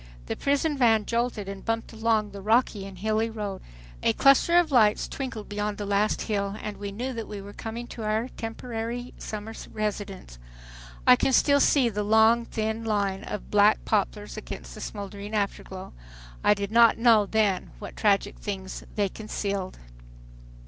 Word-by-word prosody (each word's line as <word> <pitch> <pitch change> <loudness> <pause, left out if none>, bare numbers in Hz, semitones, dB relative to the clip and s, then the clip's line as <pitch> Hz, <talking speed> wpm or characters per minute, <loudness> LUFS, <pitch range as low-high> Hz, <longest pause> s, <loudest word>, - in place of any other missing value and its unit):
The - - -3
prison 285 +1 0
van 225 -4 +4
jolted 235 -3 -1
and 195 -1 -7
bumped 225 0 -2
along 220 -2 +1
the 200 0 -8
rocky 215 -2 +2
and 195 -1 -11
hilly 220 +3 0
road. 210 -4 -5 0.4
A 115 - +3
cluster 275 - +5
of 345 -3 +3
lights 215 -5 +4
twinkled 245 -6 -5
beyond 205 0 -3
the 205 - -4
last 205 +1 +1
hill, 200 -2 -1
and 210 -1 -6
we 200 -1 -5
knew 250 +6 -4
that 230 -2 -5
we 205 - -6
were 200 +1 -10
coming 230 +2 -6
to 230 - -8
our 220 +3 -1
temporary 235 +1 -5
summer 215 +1 -6 0.2
residence. 205 - -4 0.7
I - - +8
can 265 - +1
still 285 +2 +5
see 275 -2 +4
the 210 -2 -2
long 220 +3 +4
thin 220 0 -3
line 200 -3 -1
of 210 - -6
black 210 +1 +4
poplars 210 0 -1
against - - -7
the - - -9
smoldering 205 +1 -6
afterglow. 195 -2 -3 0.5
I 210 - +5
did 200 0 -4
not 230 0 +6
know 225 -3 +5
then 205 -3 +1
what 205 - -9
tragic 205 -1 +1
things 190 -2 -5
they 205 -2 +2
concealed. 200 -2 -4
215 Hz, 170 wpm, -26 LUFS, 200-230 Hz, 0.7 s, I